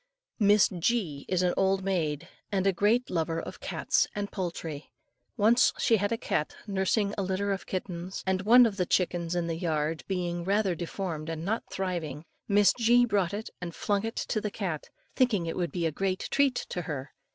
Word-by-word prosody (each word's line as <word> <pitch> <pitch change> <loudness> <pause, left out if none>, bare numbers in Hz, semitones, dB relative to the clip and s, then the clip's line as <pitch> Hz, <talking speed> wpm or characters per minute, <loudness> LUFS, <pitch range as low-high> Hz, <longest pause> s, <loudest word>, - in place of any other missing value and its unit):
Miss 205 -1 +6
G 175 -5 -1
is 185 -1 +1
an 180 - +2
old 190 0 +2
maid, 170 -4 -1 0.2
and 195 -2 0
a 195 - +4
great 220 +7 +2
lover 165 -1 0
of - - -7
cats - - +1
and 205 0 -3
poultry. 165 -5 -5 0.5
Once 230 +3 +5
she 225 - +3
had 205 +1 -1
a 230 - +1
cat 150 - -2
nursing 200 +1 0
a - - -2
litter 190 +1 -1
of 195 - -3
kittens, 185 -1 -4
and 190 0 +1
one 240 +5 +7
of 210 -3 -1
the 180 -3 0
chickens 175 -2 0
in 175 -1 0
the 165 - -2
yard 160 -2 -1
being 175 -2 -2
rather 195 0 +1
deformed 170 -2 -4
and 165 0 -4
not 220 +4 -1
thriving, 170 -6 -3 0.2
Miss 200 -1 +5
G. 240 +1 +5
brought 200 -6 +1
it 215 +2 -6
and 170 -2 -5
flung 205 -1 0
it 225 0 -3
to 215 - -2
the 210 - -2
cat, 185 -7 -4 0.3
thinking 225 -9 +2
it 165 - -3
would 175 -2 -1
be 175 -2 -2
a 160 - +1
great 190 +3 -2
treat 275 -2 +3
to 180 - -3
her. 145 -5 -5
190 Hz, 195 wpm, -28 LUFS, 170-205 Hz, 0.5 s, one